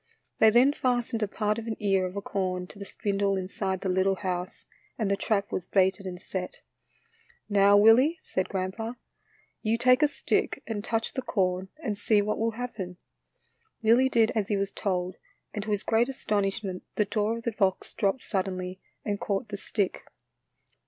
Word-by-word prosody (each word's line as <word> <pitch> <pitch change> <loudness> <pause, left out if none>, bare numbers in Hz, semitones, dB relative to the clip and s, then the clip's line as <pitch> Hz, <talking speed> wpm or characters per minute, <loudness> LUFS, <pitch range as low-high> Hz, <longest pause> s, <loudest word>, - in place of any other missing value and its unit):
They 220 - +8
then 245 +6 +5
fastened 245 -3 0
a 210 - +1
part 215 +2 -1
of 230 - -8
an 220 - -2
ear 195 -3 +2
of 180 - -9
corn 185 -3 -2
to 200 - -13
the 200 - -6
spindle 200 0 0
inside 190 0 -3
the - - -2
little 190 +1 +2
house, 180 -1 -4 0.3
and 215 -4 0
the - - +4
trap 200 0 0
was 180 - -3
baited 190 0 +2
and 180 -1 -6
set. 185 -1 -5 0.4
" - - -34
Now, 200 0 +6
Willie," 240 +10 +6
said 185 -10 -2
grandpa, 195 +5 -3 0.4
" - - -36
you 225 +1 +1
take 255 +3 +5
a 300 - +6
stick 290 - -1
and 215 -3 -4
touch 225 -1 -1
the 260 - -2
corn 185 -4 0
and 210 -6 -2
see 215 -2 +3
what 210 +1 0
will 225 0 0
happen." 200 -8 -5 0.9
Willie 240 +4 +5
did 230 -3 +3
as 215 -4 -1
he 205 - +1
was 195 0 -1
told, 185 -2 -2 0.4
and 210 -1 -4
to - - -5
his 205 -1 0
great 230 +3 +2
astonishment 200 -5 -1
the 210 - +2
door 215 +2 0
of 230 - -8
the 235 - 0
box 195 -3 0
dropped 200 +6 0
suddenly 185 -2 -2 0.3
and 205 -1 -1
caught 205 +3 -1
the 200 - -4
stick. 200 -1 -2
205 Hz, 185 wpm, -28 LUFS, 190-225 Hz, 0.9 s, They